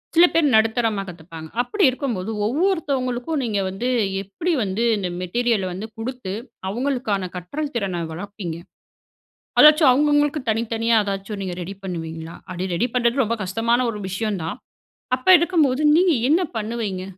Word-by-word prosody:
சில 340 +2 +8
பேர் 330 -2 +3
நடுத்தரமா 220 -2 +2
கத்துப்பாங்க. 165 -2 -10
அப்படி 400 - -1
இருக்கும்போது, 235 -7 -3 0.2
ஒவ்வொருத்தவங்களுக்கும் 280 - 0
நீங்க 215 -4 -1
வந்து 205 +7 -3 0.3
எப்படி 200 - -2
வந்து 200 +3 -1
இந்த 190 -3 -2
மெட்டீரியல 215 +1 0
வந்து 200 +5 -6
குடுத்து, 225 -4 -5 0.4
அவங்களுக்கான 225 -5 -1
கற்றல் 280 - -5
திறன 190 -6 -2
வளர்ப்பீங்க? 180 -1 -6 1.0
அதாச்சும் 305 -2 +8
அவங்க 290 +4 +3
அவங்களுக்கு 290 0 +2
தனித்தனியா 225 +1 +1
ஏதாச்சும் 200 +1 -4
நீங்க 185 -2 -4
ரெடி 195 +3 -6
பண்ணுவீங்களா? 165 -2 -6
அப்படி 185 0 -4
ரெடி 230 - +1
பண்றது 245 +2 +2
ரொம்ப 230 +2 -1
கஷ்டமான 230 +6 +1
ஒரு 210 - -7
விஷயம் 200 0 -2
தான். 165 - -4 0.6
அப்ப 255 - -17
இருக்கும் 340 -2 +3
போது, 260 +3 -1 0.2
நீங்க 360 -1 +4 0.2
என்ன 330 +5 +4 0.2
பண்ணுவீங்க? 215 -4 -3
225 Hz, 145 wpm, -22 LUFS, 190-260 Hz, 1.0 s, சில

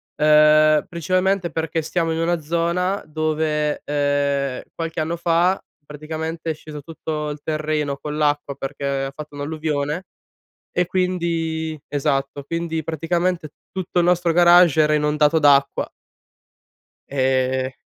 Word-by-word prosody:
ehm, 155 +1 +5
principalmente 185 +1 0
perché 160 0 -2
stiamo 165 +1 -1
in - - -3
una 170 +1 +1
zona 170 +5 0
dove, 155 -1 -1
ehm, 140 -2 0
qualche 165 0 -4
anno 165 +2 -2
fa 170 +2 +2 0.2
praticamente 160 +2 -5
è - - +1
sceso 150 -1 -9
tutto 155 0 -5
il 150 0 -6
terreno 155 -2 -1
con 150 +1 -5
l'acqua 145 -2 0
perché 140 +1 -5 0.2
ha 135 - -3
fatto 150 -1 -9
un'alluvione, 150 +2 -2 0.7
e 180 - +1
quindi 165 -3 -1
esatto. 140 -1 -1
Quindi, 165 +1 -3
praticamente 170 +1 -1 0.2
tutto 185 -1 -1
il - - +2
nostro 175 -1 +2
garage 175 -2 +6
era 150 0 +2
inondato 150 +1 +3
d'acqua. 140 -2 +3 1.2
Ehm 130 -1 0
155 Hz, 125 wpm, -21 LUFS, 150-170 Hz, 1.2 s, garage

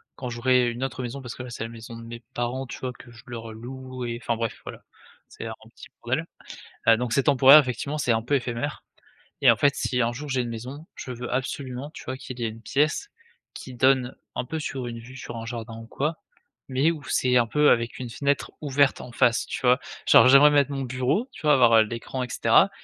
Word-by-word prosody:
quand 125 - -5
j'aurai 125 +1 +2
une 120 +2 -5
autre 130 -1 -3
maison 125 +3 -5
parce 125 -3 -7
que 130 - -7
là, 125 - -8
c'est 120 - -5
la 115 - -5
maison 115 0 -10
de 115 - -10
mes 115 0 -9
parents, 120 +2 -2
tu 125 - -8
vois, 130 -1 -4
que 120 0 -15
je 115 0 -15
leur 115 -2 -7
loue 130 +2 -7
et 120 0 -4
enfin, 115 - -1
bref, 115 -1 -4
voilà, - - -9 0.5
c'est - - -9
un - - -4 0.2
petit - - -12 0.2
bordel. - - -1 0.6
Heu, 115 0 +7
donc 120 0 -3
c'est 140 - +2
temporaire, 140 0 +8
effectivement, 140 +2 -1
c'est 125 -5 +2
un 115 0 0
peu 125 +5 -1
éphémère, 125 +2 -2 0.6
et - - +6
en - - +3
fait, 140 -1 +3
si 125 -1 0
un 115 0 +1
jour, 145 +3 -7
j'ai 130 -2 +1
une 120 - -4
maison, 130 +7 -7
je 130 - -7
veux 125 0 -6
absolument, 130 +1 -3
tu - - -10
vois, 130 - -4
qu'il 130 -1 -9
y - - -2
ait 115 - 0
une 115 +1 -11
pièce 150 - 0 0.4
qui 130 - -9
donne 130 0 +2 0.2
un - - -2
peu 160 +5 -4
sur 135 -4 -4
une 115 -1 -6
vue 125 +3 -12
sur 125 - -7
un 115 - -6
jardin 115 -1 -6
ou 115 - -9
quoi, 150 +7 -2 0.5
mais 135 +5 +2
où 155 -3 -7
c'est 125 -1 +2
un 120 -1 +3
peu 150 +5 +3
avec 115 -1 +1
une 125 -2 -5
fenêtre 140 +4 -1
ouverte 140 -1 +2
en 125 - -10
face, 120 -1 +2
tu - - -5
vois? 125 0 +4 0.3
Genre 115 - +8
j'aimerais 140 +3 +8
mettre 145 -1 +3
mon 135 -1 -3
bureau, 130 - 0
tu - - -13
vois, 150 -1 +5
avoir, 120 -4 +5
heu, 110 - +7
l'écran 115 +3 -5
et 125 - -6
cetera, - - +4
125 Hz, 245 wpm, -25 LUFS, 120-135 Hz, 0.6 s, temporaire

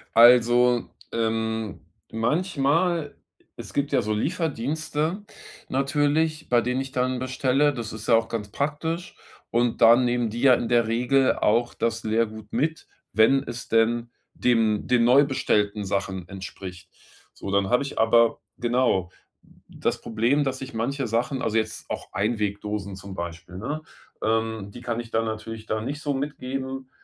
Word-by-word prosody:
Also, 120 +1 +6 0.2
ähm, 110 -3 -2 0.3
manchmal 155 - 0 0.4
es - - -9
gibt 140 0 -1
ja - - +3
so 105 +1 -1
Lieferdienste 155 - -2 0.5
natürlich, 150 +3 +1
bei 120 -1 +4
denen 125 +2 -1
ich 135 - -6
dann 130 0 0
bestelle, 130 +3 +1
das 115 -4 -5
ist 110 0 -8
ja 115 - +6
auch 115 - +2
ganz 105 -3 -4
praktisch. 155 - -3 0.4
Und 120 0 +1
da 115 +1 +9
nehmen 120 -2 +1
die 115 +2 -5
ja 130 -2 +7
in 115 - -2
der 120 -1 +3
Regel 125 +3 +2
auch 120 +3 +1
das 115 0 -1
Lehrgut 110 0 -1
mit, 160 +2 -1 0.3
wenn 135 +5 +4
es 120 0 -7
denn 115 +1 +2 0.2
dem 115 -4 +1
den 125 -2 +3
neu 130 +4 +6
bestellten 105 -6 0
Sachen 95 -2 -2
entspricht. 95 -2 -9 0.4
So, 100 - -7
dann 100 -1 +2
habe 125 +5 +3
ich 140 - -6
aber 115 +1 +4 0.2
genau, 120 -7 +1 0.6
das - - -2
Problem, 120 +6 +1
dass 135 -1 -3
ich 130 -1 -7
manche 135 +4 -2
Sachen 125 +4 -1
also, 115 0 0
jetzt 110 0 -3
auch - - -5
Einwegdosen 105 -2 -2
zum 95 0 -9
Beispiel, 85 +1 -7
ne? 145 +10 -4 0.4
Ähm, 110 -2 -1
die 120 - -10
kann 120 -1 -3
ich 115 -1 -7
dann 115 0 +1
natürlich 110 0 -5
da 110 0 -1
nicht 145 +6 -4
so 145 - -1
mitgeben. 135 -1 -4
120 Hz, 155 wpm, -25 LUFS, 110-135 Hz, 0.6 s, da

